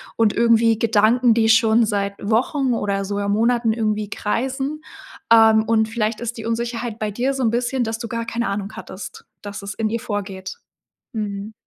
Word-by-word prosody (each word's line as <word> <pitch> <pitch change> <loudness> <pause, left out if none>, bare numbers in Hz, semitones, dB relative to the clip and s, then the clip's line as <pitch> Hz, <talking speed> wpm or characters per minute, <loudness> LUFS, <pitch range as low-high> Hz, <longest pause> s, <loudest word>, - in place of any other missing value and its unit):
und 225 -2 +2
irgendwie 230 -1 +3
Gedanken, 230 +2 +3
die 225 -1 +2
schon 225 0 +5
seit 200 -2 -1
Wochen 245 +5 +1
oder 200 -2 -1
sogar 200 +1 -2
Monaten 230 +2 +2
irgendwie 215 -2 -2
kreisen, 265 +7 -2 0.5
ähm, 220 -1 +6
und 220 0 +1
vielleicht 225 0 -2
ist 235 0 -4
die 225 - -7
Unsicherheit 230 0 -3
bei 215 -1 -1
dir 250 +6 -1
so 270 - -3
'n 230 - +3
bisschen, 245 +2 0
dass 225 0 -3
du 230 0 -6
gar 230 0 -4
keine 235 0 -2
Ahnung 200 +1 -4
hattest, 190 +2 -9 0.2
dass 205 0 -7
es 200 +1 -5
in 220 -1 -1
ihr 230 +1 -2
vorgeht. 195 -3 -5 0.6
Mhm. 210 -1 -4
225 Hz, 180 wpm, -21 LUFS, 210-235 Hz, 0.6 s, ähm